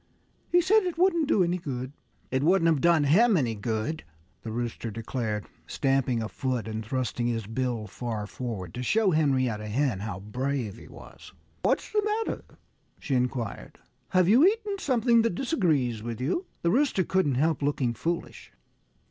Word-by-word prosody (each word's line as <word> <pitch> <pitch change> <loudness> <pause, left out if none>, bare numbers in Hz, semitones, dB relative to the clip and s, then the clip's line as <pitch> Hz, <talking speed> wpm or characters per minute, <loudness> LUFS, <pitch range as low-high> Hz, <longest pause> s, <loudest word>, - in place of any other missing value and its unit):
He 350 - +5
said 420 +5 +4
it 360 -4 -3
wouldn't 340 -4 +3
do 195 - +4
any 175 +1 0
good." 130 -5 -5 0.4
"It 130 +1 +1
wouldn't 170 +3 +3
have 160 -5 +3
done 170 -3 +4
him 200 +9 +5
any 120 -7 0
good," 110 +8 -3 0.4
the 110 - -6
Rooster 120 0 -3
declared, 110 -1 -3 0.2
stamping 135 -4 +1
a - - -3
foot 125 -2 -3
and 110 0 -4
thrusting 120 +1 -2
his 115 -3 -2
bill 115 0 -2
far 110 0 -4
forward, 105 -6 -6
to 125 - -5
show 205 - +2
Henrietta 130 -9 +1
Hen 120 -1 0
how 100 -3 -5
brave 120 +1 -3
he - - -13
was. - - -13 0.3
"What's - - 0
the 425 - +2 0.2
matter?" - - -4 0.6
she 140 - -3
inquired. 125 -3 -2 0.3
"Have 185 -1 +3
you 235 +9 +6
eaten 405 +1 +2
something 240 - +3
that 225 -6 0
disagrees 155 - 0
with 115 0 -5
you?" 175 - -1 0.2
The 170 - +3
Rooster 260 -5 +2
couldn't 180 -8 +1
help 155 +4 +1
looking 140 -4 0
foolish. 170 +9 -4
135 Hz, 165 wpm, -27 LUFS, 115-185 Hz, 0.6 s, you